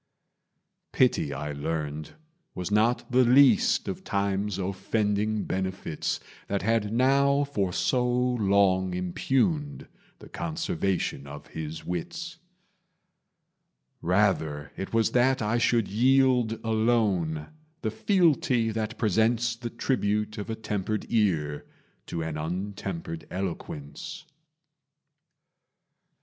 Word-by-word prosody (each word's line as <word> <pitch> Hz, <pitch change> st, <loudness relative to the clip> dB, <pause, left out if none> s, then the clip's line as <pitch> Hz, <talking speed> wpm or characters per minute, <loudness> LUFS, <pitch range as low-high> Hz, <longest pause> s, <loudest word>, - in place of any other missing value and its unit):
Pity, 70 Hz, -, +2 dB
I 75 Hz, +2 st, -4 dB
learned, 75 Hz, 0 st, -4 dB, 0.4 s
was 90 Hz, +2 st, -4 dB
not 110 Hz, +5 st, +2 dB
the 130 Hz, +1 st, +5 dB
least 140 Hz, -, +5 dB
Of 190 Hz, 0 st, -4 dB
time's 100 Hz, -, -1 dB
offending 105 Hz, +2 st, -1 dB
benefits 95 Hz, -4 st, -2 dB, 0.3 s
That 100 Hz, -1 st, -1 dB
had 110 Hz, -1 st, +1 dB
now 140 Hz, +4 st, +3 dB
for 105 Hz, -10 st, -1 dB
so 125 Hz, +6 st, +1 dB
long 100 Hz, -7 st, +2 dB
impugned 135 Hz, -, 0 dB, 0.3 s
The -, -, -13 dB
conservation 160 Hz, -, -2 dB
of 75 Hz, +1 st, -9 dB
his 80 Hz, 0 st, -6 dB
wits: 160 Hz, -, -5 dB, 1.6 s
Rather 80 Hz, -6 st, +1 dB
it 95 Hz, -, -5 dB
was 115 Hz, -1 st, +2 dB
that 130 Hz, +2 st, +3 dB
I 110 Hz, +2 st, +1 dB
should 115 Hz, -2 st, +2 dB
yield, 125 Hz, 0 st, +3 dB
Alone, 110 Hz, -9 st, +1 dB, 0.3 s
the 110 Hz, -, 0 dB
fealty 140 Hz, -, +2 dB
that 110 Hz, 0 st, -3 dB
presents 115 Hz, +2 st, +2 dB
The 120 Hz, 0 st, -6 dB
tribute 105 Hz, -4 st, -1 dB
of 105 Hz, -, -6 dB
a 110 Hz, -, -2 dB
tempered 105 Hz, -1 st, -3 dB
ear 80 Hz, -10 st, +1 dB, 0.4 s
To 85 Hz, -, -3 dB
an 80 Hz, -1 st, -4 dB
untempered 85 Hz, 0 st, -4 dB
eloquence. 85 Hz, -, -6 dB
105 Hz, 105 wpm, -27 LUFS, 90-125 Hz, 1.6 s, the